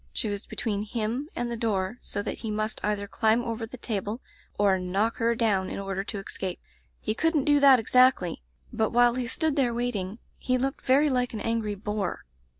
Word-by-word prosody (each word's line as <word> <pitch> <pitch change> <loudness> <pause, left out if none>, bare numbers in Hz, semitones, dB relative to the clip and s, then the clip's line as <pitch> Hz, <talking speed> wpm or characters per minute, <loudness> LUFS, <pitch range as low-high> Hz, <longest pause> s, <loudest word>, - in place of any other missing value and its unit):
She 220 - -2
was 205 0 -4
be - - -9
tween 205 -3 -1
him 230 +6 -3
and 240 0 -2
the - - -2
door, 220 -1 -1
so 205 - -3
that - - -4
he 225 - -4
must 215 +1 -2
either 205 -1 0
climb 220 +3 +2
over 230 -1 -3
the 255 - -9
table 215 -1 -3 0.4
or 195 -2 +3
knock 195 +5 0
her 235 -1 +2
down 200 -5 +1
in - - -5
order 195 -1 -3
to 210 - -4
escape. 190 -2 -4 0.4
He - - -1
couldn't 320 +3 +1
do 290 0 +4
that 275 -2 +8
exactly, 250 -6 +3 0.3
but 220 -2 +1
while 240 0 +4
he 250 -1 -2
stood 315 +4 0
there 250 -5 +1
waiting 220 -5 -2 0.2
he 255 0 +1
looked 270 +2 -3
very 280 +3 +5
like 250 -2 0
an - - -3
angry 225 -2 -1
boar. 210 -1 -3
225 Hz, 205 wpm, -27 LUFS, 205-245 Hz, 0.4 s, that